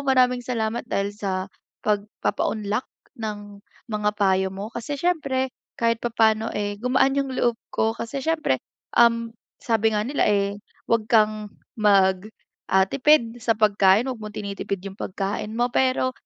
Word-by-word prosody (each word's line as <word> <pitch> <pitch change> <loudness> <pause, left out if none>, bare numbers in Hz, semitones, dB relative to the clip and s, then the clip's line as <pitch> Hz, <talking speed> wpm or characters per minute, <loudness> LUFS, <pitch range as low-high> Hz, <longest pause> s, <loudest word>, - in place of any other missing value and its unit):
maraming 255 -2 +3
salamat 235 -2 -2
dahil 200 -2 -1
sa 190 -3 -3 0.4
pagpapaunlak 210 +1 -1 0.4
ng 205 -2 -6 0.3
mga 210 -1 +1
payo 190 -1 +3
mo 195 +2 -6
kasi 260 +5 -4
siyempre 275 -7 0 0.3
kahit 230 0 +3
papaano, 225 -1 +2
eh, 205 0 -2
gumaan 260 +2 +2
yung 275 -1 0
loob 240 -2 +1 0.2
ko 225 +1 0
kasi 235 +4 -4
siyempre, 310 - 0 0.4
um, 230 -1 +4 0.3
sabi 225 -1 +1
nga 210 - 0
nila, 275 -1 +1
eh, 200 0 +1 0.2
huwag 225 -2 0
kang 215 -2 +3 0.3
mag, 195 -2 +3 0.4
ah, 190 0 +4
tipid 255 -2 +3
sa 230 0 +2
pagkain. 205 0 +4
'Wag 250 -4 -4
mong 215 -1 -8
tinitipid 200 -1 -3
yung 195 - -6
pagkain 200 +2 -3
mo, 240 +1 +2
pero 255 0 +2
220 Hz, 145 wpm, -24 LUFS, 205-245 Hz, 0.4 s, um